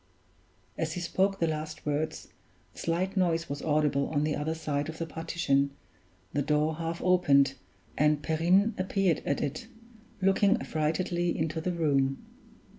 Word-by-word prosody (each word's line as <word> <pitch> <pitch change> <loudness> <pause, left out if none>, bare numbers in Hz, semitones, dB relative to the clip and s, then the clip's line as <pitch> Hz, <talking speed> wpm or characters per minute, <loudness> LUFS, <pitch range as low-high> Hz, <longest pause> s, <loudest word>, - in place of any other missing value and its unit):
As 160 -1 -1
he 180 - -4
spoke 190 +3 +1
the 170 - +1
last 155 -1 -4
words, 150 +1 -2 0.4
a - - -22
slight 180 +4 -1
noise 170 -3 +1
was 140 0 -5
audible 150 -2 +1
on 145 -1 0
the 150 0 0
other 155 +2 -2
side 150 -2 -2
of 160 - -7
the 165 - -3
partition, 150 -4 0 0.6
the 145 - +1
door 150 +2 +1
half 165 0 -4
opened, 145 -7 +4 0.5
and 150 0 +3
Perrine 180 +7 +3
appeared 185 -3 +1
at 140 - 0
it, 155 +10 -4 0.5
looking 195 +3 +3
affrightedly 170 +1 -1
into 160 0 -1
the 180 - -1
room. 140 -5 +1
160 Hz, 150 wpm, -29 LUFS, 150-175 Hz, 0.6 s, opened